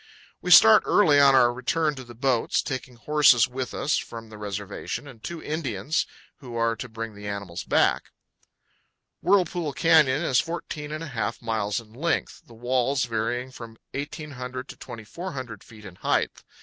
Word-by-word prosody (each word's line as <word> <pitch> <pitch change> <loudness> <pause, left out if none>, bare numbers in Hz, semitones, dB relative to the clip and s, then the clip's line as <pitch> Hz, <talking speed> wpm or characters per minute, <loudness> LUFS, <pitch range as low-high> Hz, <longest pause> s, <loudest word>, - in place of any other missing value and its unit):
We - - -4
start 110 - +9
early 155 -9 +5
on 140 -1 +7
our 120 -2 +5
return 150 +5 0
to 130 -2 -8
the 120 -1 -13
boats, 125 -1 +1
taking 130 -1 -5
horses 135 -2 +4
with 130 0 -5
us 150 - 0
from 115 -1 -9
the 110 - -11
reservation, 100 +6 -5
and 120 -6 -13
two 170 -2 -6
Indians, 155 0 -2 0.3
who 125 -4 -10
are 115 0 +1
to 125 - -7
bring 115 0 -6
the 105 0 -9
animals 100 -4 -5
back. - - +2 1.2
Whirlpool 175 -6 +1
Canyon 155 -2 +4
is 130 -6 +3
14 160 -3 -4
1/4 140 -10 -4
miles 110 -2 -1
in 110 -2 -15
length, 160 +7 -2
the 115 - -15
walls 125 +3 0
varying 120 +2 -2
from 115 -3 -11 0.2
1,800 135 -3 -6
to - - -8
2,400 125 - -8
feet 110 -2 -15
in 90 -2 -11
height. - - 0
125 Hz, 160 wpm, -25 LUFS, 115-150 Hz, 1.2 s, start